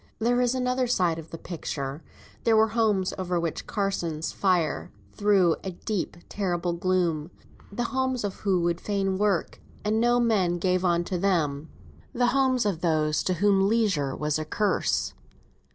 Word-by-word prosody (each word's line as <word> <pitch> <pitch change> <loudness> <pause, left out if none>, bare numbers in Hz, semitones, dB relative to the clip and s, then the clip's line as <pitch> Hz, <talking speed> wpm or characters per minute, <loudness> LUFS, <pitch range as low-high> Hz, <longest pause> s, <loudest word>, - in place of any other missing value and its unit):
There 245 +2 +2
is 245 +1 +1
another 255 0 0
side 180 -8 +1
to - - -5
the 165 - -7
picture. 150 -4 -5 0.4
There 225 -1 +4
were 220 0 +4
homes 215 -4 +1
over 180 -1 -1
which 170 -2 -3
Carsons' 175 -6 -2
fire 180 -5 0 0.2
threw 195 -5 +3
a 190 - -3
deep, 185 0 -4
terrible 175 -3 -1
gloom; 170 -3 0 0.4
the 240 +4 -2
homes 260 0 -1
of 205 - -1
those - - -19
who 190 -4 +2
would 170 0 0
fain 195 -2 -1
work, 205 -5 0 0.3
and 215 +1 +1
no 240 +1 +3
man 200 -7 +2
gave 185 +1 +1
unto 175 +1 +1
them 160 -6 0 0.4
the 245 0 +2
homes 260 -3 +2
of 185 -5 -1
those 155 -3 +1
to 185 - +1
whom 195 +1 +3
leisure 190 -12 +1
was 150 0 -1
a 155 - -3
curse. 205 +4 0
190 Hz, 165 wpm, -26 LUFS, 170-220 Hz, 0.4 s, There